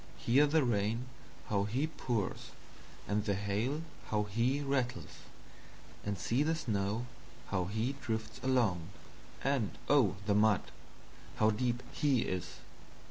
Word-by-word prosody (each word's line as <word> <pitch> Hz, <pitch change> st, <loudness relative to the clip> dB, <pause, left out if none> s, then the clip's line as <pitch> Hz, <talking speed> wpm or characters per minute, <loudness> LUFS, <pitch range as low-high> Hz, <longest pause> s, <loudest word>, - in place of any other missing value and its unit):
Hear 140 Hz, +5 st, +4 dB
the 155 Hz, +1 st, +3 dB
Rain, 115 Hz, 0 st, +1 dB, 0.4 s
how 100 Hz, -1 st, +2 dB
he 125 Hz, +8 st, 0 dB
pours, 125 Hz, -10 st, -2 dB, 0.6 s
and 105 Hz, 0 st, +1 dB
the 100 Hz, -2 st, +1 dB
Hail, 105 Hz, +10 st, -1 dB, 0.2 s
how 105 Hz, -1 st, +1 dB
he 115 Hz, +7 st, +1 dB
rattles; 130 Hz, -3 st, -2 dB, 0.8 s
and 100 Hz, -1 st, -2 dB
see 115 Hz, +9 st, +1 dB
the 160 Hz, +2 st, +2 dB
Snow, 110 Hz, -6 st, -1 dB, 0.4 s
how 95 Hz, -2 st, 0 dB
he 110 Hz, +7 st, -1 dB
drifts 110 Hz, -3 st, -3 dB
along, 110 Hz, -10 st, +1 dB, 0.5 s
and 135 Hz, -7 st, 0 dB
of 130 Hz, -10 st, +4 dB
the 105 Hz, -, +3 dB
Mud, 105 Hz, -1 st, +4 dB, 0.7 s
how 110 Hz, 0 st, +4 dB
deep 120 Hz, +2 st, -1 dB
he 140 Hz, -5 st, +2 dB
is! 90 Hz, -1 st, -3 dB
115 Hz, 130 wpm, -33 LUFS, 100-130 Hz, 0.8 s, Hear